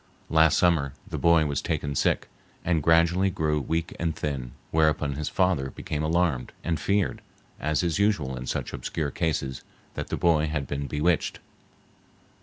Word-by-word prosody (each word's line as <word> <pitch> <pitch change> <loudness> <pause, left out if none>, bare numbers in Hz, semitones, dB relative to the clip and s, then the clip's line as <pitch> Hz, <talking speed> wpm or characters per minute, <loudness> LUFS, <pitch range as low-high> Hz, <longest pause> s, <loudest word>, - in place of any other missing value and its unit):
Last 80 -1 +5
summer 80 -6 +2
the - - -4
boy 85 -2 +5
was 70 -2 -1
taken 70 -1 -2
sick, - - +1 0.4
and 85 -3 +2
gradually 85 +5 +4
grew 75 -4 0
weak 80 +4 -2
and 85 -2 -1
thin, 65 -5 -4 0.2
whereupon 75 -2 +2
his 75 +2 -3
father 90 -8 +1
became 75 +3 -4
alarmed, 80 -5 0
and 80 -2 -1
feared, 100 0 0 0.4
as 75 +2 0
is 85 +1 0
usual 90 -11 +1
in 65 0 -6
such - - -3
obscure 70 +3 -3
cases, 70 -5 -2 0.3
that - - -4
the - - -3
boy 80 -3 +3
had 75 -2 -2
been 70 +1 -3
bewitched. 75 +4 0
80 Hz, 160 wpm, -26 LUFS, 70-85 Hz, 0.4 s, Last